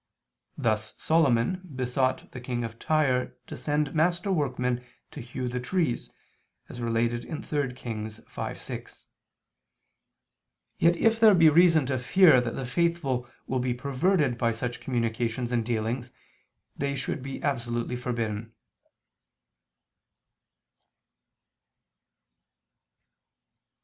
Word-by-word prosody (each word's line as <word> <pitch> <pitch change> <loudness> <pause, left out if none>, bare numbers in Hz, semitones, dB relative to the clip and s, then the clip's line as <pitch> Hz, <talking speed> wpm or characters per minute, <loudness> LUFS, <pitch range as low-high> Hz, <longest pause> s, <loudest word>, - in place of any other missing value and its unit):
Thus 110 -1 -1
Solomon 155 +1 +2
besought 130 +1 -1
the 125 - -8
King 120 -1 -3
of 115 0 -6
Tyre 135 -5 +1
to - - -7
send 150 -1 -1
master 175 +4 +1
workmen 125 -6 0 0.3
to - - -8
hew 125 +2 -4
the 125 +1 -2
trees, 150 0 -1 0.6
as 120 - -8
related 120 +1 0
in 155 - -6
3 145 -4 -1
Kings 110 -3 -6
5:6. - - -7 1.7
Yet, 170 +1 +4
if 225 +3 +3
there 220 -3 +7
be 165 -3 +7
reason 165 -2 +5
to 130 -1 -1
fear 130 +1 +6
that 120 -1 -3
the 135 - -3
faithful 135 -4 0 0.2
will 130 - -1
be 125 -1 0
perverted 140 0 +1
by 115 -2 +2
such 120 +2 -4
communications 120 0 -1
and 120 -2 +1
dealings, 115 +2 -2 0.7
they 140 0 -2
should 130 0 -3
be 135 +1 -6
absolutely 120 -3 -1
forbidden. 115 -3 -3
125 Hz, 110 wpm, -27 LUFS, 120-150 Hz, 1.7 s, there